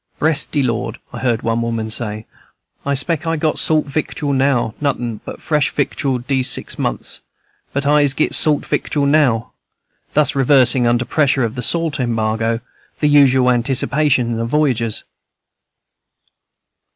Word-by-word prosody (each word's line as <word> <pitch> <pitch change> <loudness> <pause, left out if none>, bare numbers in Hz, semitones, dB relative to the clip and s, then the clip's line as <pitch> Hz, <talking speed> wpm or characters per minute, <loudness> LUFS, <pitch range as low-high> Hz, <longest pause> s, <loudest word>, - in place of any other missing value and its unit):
"Bress 155 -1 +1
de 145 -3 -1
Lord," 115 -2 -2 0.2
I 120 - -6
heard 120 -3 -1
one 115 0 0
woman 115 -1 -3
say, 110 -1 -2 0.6
"I 140 - +1
spec' 165 +4 0
I 165 - +1
got 155 0 -1
salt 155 -1 +2
victual 145 0 -3
now, 130 -4 +1
notin' 120 -6 -2
but - - -8
fresh 150 -2 0
victual 140 -2 -1
dese 130 +1 0
six - - -2
months, - - -3 0.5
but 140 +1 -2
Ise 145 -1 +3
get 155 - 0
salt 150 -2 +3
victual 145 -2 -1
now," 140 -6 +2 0.6
thus 150 -2 +3
reversing, 130 -2 +3
under 120 +1 +1
pressure 135 0 +1
of 115 -1 -2
the 125 - -5
salt 165 +3 -1
embargo, 115 -1 -1 0.4
the 150 - +2
usual 130 -3 +5
anticipations 125 0 +1
of 115 0 -2
voyagers. 125 -7 0
130 Hz, 145 wpm, -18 LUFS, 115-145 Hz, 0.6 s, usual